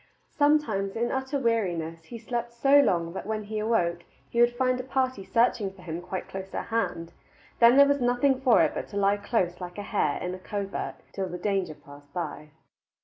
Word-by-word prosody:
Sometimes, 265 -10 +2
in 235 +1 0
utter 265 +2 -1
weariness, 175 -10 -1
he 235 - -8
slept 235 +1 -4
so 275 +4 +5
long 170 -10 +2
that 190 - -6
when 215 -1 -2
he 215 +1 -4
awoke 175 -6 0 0.3
he 235 - +2
would 240 0 +4
find 255 0 +1
a - - -3
party 260 -4 -1
searching 230 -3 +1
for 190 -1 -16
him 165 0 -5
quite 185 +1 -5
close 190 0 -7
at - - -4
hand; 190 -7 -2 0.5
then 235 +2 +7
there 280 - +9
was 285 -1 +1
nothing 250 +2 +2
for 255 -3 +5
it - - +1
but - - -4
to 205 - -6
lie 200 0 +3
close 200 -4 -1
like 180 +1 -7
a 205 - -4
hare 205 0 0
in 180 0 -3
a 185 - -7
covert 200 +1 -4 0.2
till 190 -2 -3
the 180 - -5
danger 190 -4 -1
passed 145 0 -16
by. 155 -3 -4
210 Hz, 205 wpm, -27 LUFS, 180-245 Hz, 0.5 s, there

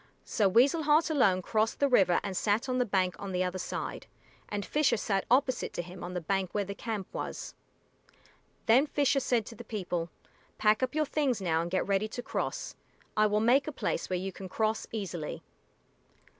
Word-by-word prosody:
So 205 -3 +2
Weasel 265 - +4
Heart 310 +2 +3
alone 195 -11 +3
crossed 220 +2 0
the 280 - +4
river 190 -9 +4
and 195 -2 -4
sat 215 +7 +1
on 255 0 0
the 250 - +1
bank 185 -3 +1
on 195 -2 -5
the 180 0 +1
other 185 0 -2
side, - - -5 0.4
and 205 -1 -3
Fisher 300 -5 +2
sat 195 -2 -1
opposite 255 +1 +2
to 175 - -3
him 180 +1 -10
on 180 +1 -6
the - - 0
bank 190 +2 -1
where 205 -1 +1
the 200 - -5
camp 210 -2 -4
was. - - -5 1.1
Then 255 +6 +5
Fisher 285 -1 +2
said 240 -5 +1
to - - -9
the 235 - -9
people, 180 -6 -3 0.5
"Pack 215 +2 +3
up 260 +2 -1
your 310 0 +2
things 275 -6 0
now 165 -4 +1
and 170 - -3
get 185 +1 0
ready 200 +1 +1
to 245 +3 -6
cross. - - -3 0.4
I 215 0 +4
will 210 0 +1
make 260 +6 +4
a - - -2
place - - -2
where 185 - 0
you 190 +2 -3
can 190 0 -9
cross 220 +2 -1
easily." 185 -8 -4
210 Hz, 200 wpm, -30 LUFS, 185-250 Hz, 1.1 s, Then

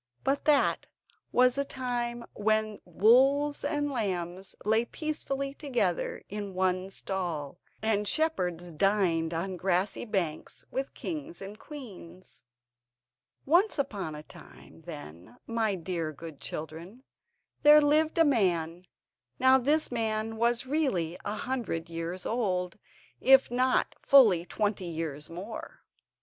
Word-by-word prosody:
But 275 +1 0
that 295 -2 +3 0.4
was 250 0 +5
the 280 - 0
time 240 -3 -3
when 215 0 0
wolves 265 - +4
and 290 -1 -1
lambs 190 -5 -3
lay 220 +2 +3
peacefully 275 -1 -3
together 245 - -1
in 205 -2 -6
one 185 0 0
stall, 175 -6 -4 0.2
and 210 -2 +1
shepherds 180 - 0
dined 170 -2 +1
on 180 +3 -3
grassy 185 +4 0
banks 180 -8 -3
with 270 +1 -3
kings 315 0 -5
and 200 +2 -9
queens. 185 - -11 1.0
Once 355 +9 +3
upon 205 - -3
a 150 - -8
time, - - -15
then, 110 - -10
my 225 -3 0
dear 170 -3 -3
good 155 0 -10
children, 165 - -7 0.6
there 300 +1 +8
lived 305 +2 +2
a 330 - +6
man. 180 - +1 0.5
Now 260 0 +5
this 295 +4 +1
man 225 -1 -1
was 235 +2 +2
really 255 - 0
a 205 - -3
hundred 210 -9 -3
years 165 +2 -4
old, 185 -5 -1 0.4
if 265 -2 +5
not 255 +1 +2
fully 215 -12 +6
twenty 205 -3 -1
years 160 -3 -5
more. 205 - -8
210 Hz, 120 wpm, -29 LUFS, 175-260 Hz, 1.0 s, there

